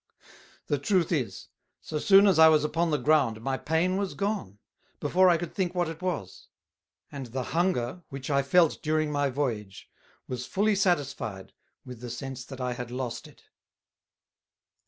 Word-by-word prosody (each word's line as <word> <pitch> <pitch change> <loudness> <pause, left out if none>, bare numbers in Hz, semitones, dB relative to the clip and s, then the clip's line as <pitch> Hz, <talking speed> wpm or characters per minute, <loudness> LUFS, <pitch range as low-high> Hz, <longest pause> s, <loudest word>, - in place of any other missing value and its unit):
The 145 - -1
truth 175 +3 +1
is, 140 -9 -2 0.3
so 155 - -4
soon 195 +4 +6
as 190 -5 +4
I 160 - +9
was 155 -2 +4
upon 165 +3 0
the 150 - +1
ground 145 -8 +2
my 135 +4 -2
pain 165 +6 0
was 200 -1 -2
gone, 200 - -3 0.4
before 185 +1 +4
I 170 - +4
could 175 +1 -6
think 185 -3 -2
what 175 -2 +1
it 165 +1 -7
was; 115 - -4 0.6
and 140 -3 -6
the 130 +2 -4
Hunger, 170 -4 0
which 135 0 -6
I 140 0 +3
felt 160 +4 +3
during 155 0 0
my 145 -1 +1
Voyage, 115 -8 -4 0.4
was 125 -1 -5
fully 210 +2 +1
satisfied 140 - -1 0.3
with 125 -3 -9
the 125 - -6
sense 130 +2 -6
that 135 0 -10
I 125 -1 -2
had 120 -1 -6
lost 125 -2 -5
it. - - -19
145 Hz, 170 wpm, -27 LUFS, 125-175 Hz, 0.6 s, I